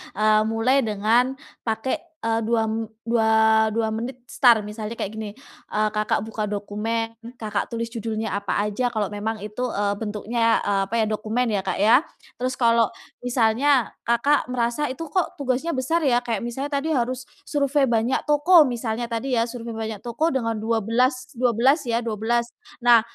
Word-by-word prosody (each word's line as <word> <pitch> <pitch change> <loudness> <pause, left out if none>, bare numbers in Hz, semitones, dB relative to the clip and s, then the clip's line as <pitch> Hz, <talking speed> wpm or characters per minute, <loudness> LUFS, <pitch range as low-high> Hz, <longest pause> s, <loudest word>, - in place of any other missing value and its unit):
eee, 215 +1 +4
mulai 225 +5 +2
dengan 225 +5 +2 0.3
pake, 225 +3 -1 0.3
eee, 225 0 +1
2 230 0 +2
m 225 0 -2 0.2
dua 220 -1 +4
dua 225 -1 0
menit 240 +3 -4
start, 235 -4 +5
misalnya 210 +1 -6
kayak 200 - -4
gini, 215 -1 -4 0.4
eee, 215 0 +2
Kakak 215 0 0
buka 220 -1 -3
dokumen, 215 +3 -3 0.2
Kakak 210 -2 -1
tulis 230 0 -2
judulnya 220 -2 -3
apa 200 -1 -3
aja 210 +4 -1
kalau 210 -2 -1
memang 210 +1 -4
itu, 215 +4 -4
eee, 205 -4 0
bentuknya, 225 +2 0
eee, 200 -1 +1
apa 215 - -11
ya, - - +2
dokumen 220 +3 -1
ya 200 -3 -1
Kak - - -1
ya. 230 +8 +5 0.3
Terus 255 +1 -1
kalau 230 -3 +3 0.3
misalnya 245 +2 +3 0.2
Kakak 255 +5 +2
merasa 250 +3 -1
itu 320 +2 -7
kok 365 0 0
tugasnya 270 +6 -1
besar 265 +6 0
ya 245 -3 +3
kayak 235 -2 -3
misalnya 265 +4 -4
tadi 315 +3 -1
harus 255 -1 -1 0.2
survei 285 -1 +2
banyak 230 +2 +1
toko 310 +4 +6
misalnya 235 -2 -3
tadi 245 +3 -2
ya, 235 0 +1
survei 235 -1 -6
banyak 220 -1 -4
toko 275 +8 0
dengan 235 -6 -1
dua 225 -1 0
belas 255 +4 0
dua 250 0 +2
belas 270 +6 +4
ya, 230 - +2
12, 230 +2 0 0.3
nah 240 -2 +6
230 Hz, 170 wpm, -23 LUFS, 220-250 Hz, 0.4 s, toko